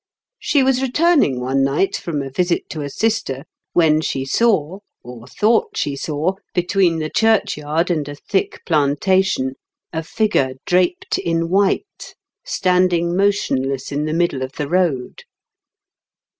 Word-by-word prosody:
She 290 -2 +2
was 260 -1 +2
returning 270 - +2
one 135 +2 0
night 140 +8 +1
from 150 -5 -3
a 135 - -7
visit 175 +4 0
to 155 - -5
a 145 - -4
sister 145 -9 -1 0.3
when 155 -2 +4
she 135 -3 -2
saw, 190 - +1 0.2
or 120 -1 -11
thought 215 - +1
she 140 - -1
saw, 155 +5 -1 0.2
between 180 -1 +2
the 155 -1 -3
churchyard 170 -7 +1
and 150 -4 -1
a 145 - -6
thick 190 +6 -2
plantation, 150 -2 +1 0.4
a 160 - -1
figure 160 - 0
draped 180 0 +1
in 165 0 -1
white, 200 - -1 0.3
standing 180 - +1
motionless 135 -10 0
in 145 +1 -1
the 155 - -2
middle 165 -5 0
of 130 +1 -4
the 145 - -4
road. 165 -7 0
165 Hz, 140 wpm, -19 LUFS, 140-190 Hz, 0.4 s, when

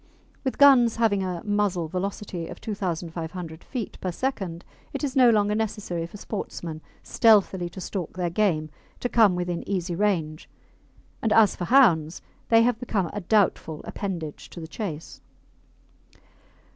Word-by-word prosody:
With 260 - -2
guns 260 -5 +6
having 220 -4 +2
a 180 -2 -3
muzzle 205 -5 0
velocity 185 -1 -4
of - - -9
2,500 170 -4 -5
feet 245 -6 -6
per 185 - -2
second, 190 -6 -3 0.3
it - - -4
is 280 -1 -2
no 255 -2 +7
longer 210 -2 +3
necessary 210 -6 -2
for 205 - -11
sportsmen 170 -6 -6 0.2
stealthily 195 -5 +3
to 185 - -10
stalk 185 -2 -5
their 175 -2 -1
game 165 -6 +1 0.3
to - - -1
come 220 -6 +4
within 175 -1 -2
easy 180 -3 -1
range, 170 -5 -1 0.7
and 225 - 0
as 215 -1 +5
for 175 - -4
hounds, 175 - +4 0.3
they 225 0 +6
have 240 -1 +1
become 205 -8 -1
a 205 - -4
doubtful 180 -5 +1
appendage 170 -7 -5
to - - -10
the 160 - -7
chase. 165 -7 -6
190 Hz, 145 wpm, -25 LUFS, 170-220 Hz, 0.7 s, no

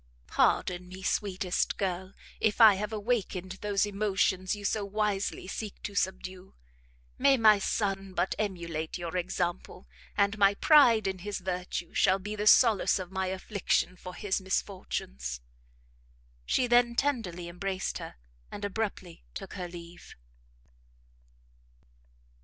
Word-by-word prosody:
"Pardon 180 0 +1
me, 190 +1 -10
sweetest 190 -2 -1
girl, 190 0 -3 0.2
if 220 +1 +1
I 220 -3 +9
have 210 +2 -3
awakened 200 -4 -2
those 205 -1 +1
emotions 200 -2 0
you 205 -1 -8
so 210 +1 0
wisely 205 -1 -1
seek 205 +2 -6
to 205 - -5
subdue. 190 -1 -3 0.6
May 275 0 +5
my 215 -3 +6
son 195 -2 -2
but 175 +2 +1
emulate 170 -6 -3
your 175 -1 -5
example, 180 0 -3 0.3
and 200 +1 +2
my 200 0 +5
pride 265 -6 +6
in 190 -1 -2
his 205 +3 -4
virtue 180 -2 -4
shall 190 - +4
be 205 +2 -6
the 210 0 -2
solace 225 -3 +5
of 185 -1 -6
my 190 -1 -1
affliction 190 0 -1
for 180 0 -9
his 200 -1 -1
misfortunes." 65 - -3 1.1
She 255 - +2
then 240 0 +3
tenderly 225 -12 -1
embraced 185 +2 -3
her, - - -8 0.4
and 205 - -5
abruptly 195 -4 -4
took 195 - -7
her 180 -2 -5
leave. 170 0 -11
195 Hz, 130 wpm, -29 LUFS, 180-210 Hz, 1.1 s, I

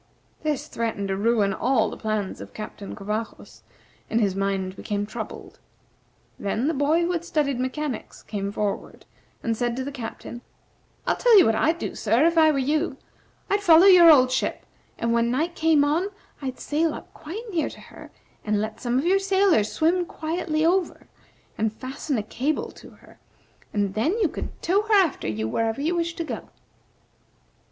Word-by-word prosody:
This 300 -3 -1
threatened 220 -4 -3
to 195 - 0
ruin 205 -1 +2
all 225 +1 +1
the - - -6
plans 215 -3 -3
of - - -11
Captain 210 -2 -7
Covajos, 215 +2 -5 0.5
and 225 - +1
his 200 -4 +1
mind 195 -1 -1
became 205 +1 -3
troubled. 205 - -8 0.8
Then 220 +6 -1
the 325 - +1
boy 295 +4 +2
who 345 - 0
had 340 -2 -2
studied 290 -6 0
mechanics 260 0 -4
came 200 -2 -4
forward 205 -1 -4 0.4
and 230 -1 0
said 240 +1 -1
to 260 - -3
the 280 - -5
Captain: 240 -2 -7 0.6
"I'll - - +1
tell 475 -3 +6
you 375 - +8
what 225 - +3
I'd 315 +9 +2
do, - - -4
sir, 230 +7 +2
if 335 0 +3
I 320 -1 +6
were 300 - +1
you; 300 +5 0 0.5
I'd 405 +1 +1
follow 340 -2 +7
your 360 -3 +9
old 255 -5 +6
ship, 255 - -1 0.3
and 230 0 0
when 235 0 +2
night 310 +8 0
came 320 -3 +3
on 315 +6 +1 0.3
I'd 260 -2 -5
sail 310 +1 0
up - - -11
quite 370 +10 -7
near 320 -4 0
to - - -12
her, - - -13 0.3
and 210 -1 0
let 215 +1 -4
some 245 0 0
of 275 - 0
your 385 +3 +4
sailors 385 - +2
swim 345 +2 +1
quietly 315 -1 -2
over, 360 +2 0 0.5
and 220 0 +1
fasten 265 +4 -4
a 210 - -1
cable 270 +8 -2
to - - -14
her, - - -19 0.5
and 200 -2 -1
then 255 - +1
you 405 -8 +2
could - - -7
tow 385 +4 +3
her 430 0 +2
after 370 -7 +2
you 110 0 -2
wherever 225 - -1
you 320 +5 0
wished 340 0 -2
to 335 - -2
go." 315 - -6
270 Hz, 185 wpm, -24 LUFS, 220-330 Hz, 0.8 s, your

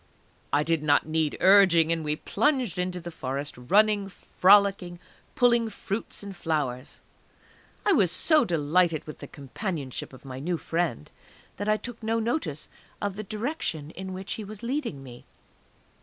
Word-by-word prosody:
I 145 - +3
did 165 0 0
not 145 -1 +3
need 155 -1 -1
urging, 185 -4 +6
and 165 -1 0
we 150 0 0
plunged 230 - 0
into 180 0 -1
the 175 0 -8
Forest, 140 -1 -4
running, 200 - +2
frolicking, 195 -2 +3 0.4
pulling 235 -2 +3
fruits 205 0 -5
and 200 -1 -8
flowers. 145 -7 -3 0.8
I 410 - +4
was 200 - +4
so 310 - +4
delighted 165 0 +1
with 150 - -9
the - - -8
companionship 140 - -5
of 130 +1 -15
my 130 -1 -7
new 170 +5 -1
friend 165 - -2 0.5
that 205 +2 -2
I 215 - +3
took 245 +1 -8
no 225 +1 0
notice 220 - -2 0.3
of 205 -2 -3
the 215 - -4
direction 210 - -4
in 190 +1 -7
which 190 +1 -5
he 220 - -5
was 210 +2 -10
leading 235 - -3
me. 120 -2 -12
180 Hz, 155 wpm, -27 LUFS, 150-210 Hz, 0.8 s, urging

